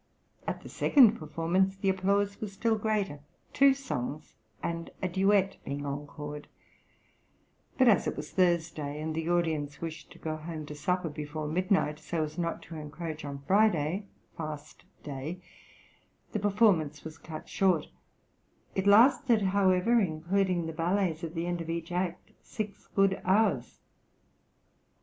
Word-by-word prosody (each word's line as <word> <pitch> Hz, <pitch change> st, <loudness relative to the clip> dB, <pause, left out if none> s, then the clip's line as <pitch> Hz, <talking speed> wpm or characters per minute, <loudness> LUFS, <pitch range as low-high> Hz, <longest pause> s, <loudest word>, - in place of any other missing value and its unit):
At -, -, -3 dB
the -, -, -9 dB
second 235 Hz, -6 st, +5 dB
performance 170 Hz, +5 st, 0 dB
the 195 Hz, 0 st, 0 dB
applause 200 Hz, +1 st, +1 dB
was 210 Hz, -2 st, -4 dB
still 220 Hz, +3 st, +1 dB
greater, 210 Hz, -8 st, -1 dB, 0.3 s
two 275 Hz, -1 st, +6 dB
songs 150 Hz, -, -5 dB, 0.3 s
and 170 Hz, 0 st, -3 dB
a 185 Hz, -, -1 dB
duet 195 Hz, +2 st, +2 dB
being 140 Hz, +1 st, -4 dB
encored; 145 Hz, +1 st, -6 dB, 1.3 s
but 260 Hz, -, +5 dB
as 215 Hz, -5 st, +5 dB
it -, -, -2 dB
was 150 Hz, +1 st, -6 dB
Thursday, 165 Hz, -5 st, +1 dB
and 155 Hz, +1 st, -3 dB
the 160 Hz, +1 st, -2 dB
audience 155 Hz, -5 st, 0 dB
wished 160 Hz, -1 st, -7 dB
to -, -, -13 dB
go 155 Hz, -1 st, -4 dB
home 155 Hz, -1 st, -6 dB
to 150 Hz, -, -7 dB
supper 180 Hz, +3 st, -1 dB
before 150 Hz, 0 st, -5 dB
midnight, 175 Hz, -2 st, +1 dB
so 160 Hz, +1 st, -2 dB
as 155 Hz, +2 st, -5 dB
not 170 Hz, -1 st, -2 dB
to 165 Hz, 0 st, -9 dB
encroach 155 Hz, +1 st, -6 dB
on 140 Hz, -1 st, -6 dB
Friday 195 Hz, -1 st, +2 dB, 0.3 s
(fast 155 Hz, -2 st, -7 dB, 0.2 s
day) 145 Hz, +5 st, -5 dB, 0.9 s
the 215 Hz, -, -1 dB
performance 195 Hz, -8 st, +2 dB
was 160 Hz, 0 st, -9 dB
cut 155 Hz, -2 st, -8 dB
short; 185 Hz, -6 st, +2 dB, 0.9 s
it 190 Hz, +1 st, -1 dB
lasted, 235 Hz, +1 st, +6 dB
however, 195 Hz, +4 st, +3 dB
including 180 Hz, 0 st, 0 dB
the 160 Hz, -, -4 dB
ballets 170 Hz, 0 st, 0 dB
at 165 Hz, +1 st, -5 dB
the 165 Hz, +1 st, -1 dB
end 175 Hz, -1 st, -2 dB
of 165 Hz, -, -6 dB
each 165 Hz, 0 st, -3 dB
act, 180 Hz, 0 st, -2 dB
six 210 Hz, -2 st, -6 dB
good 195 Hz, -1 st, +3 dB
hours. 190 Hz, -, +1 dB
170 Hz, 145 wpm, -30 LUFS, 155-195 Hz, 1.3 s, two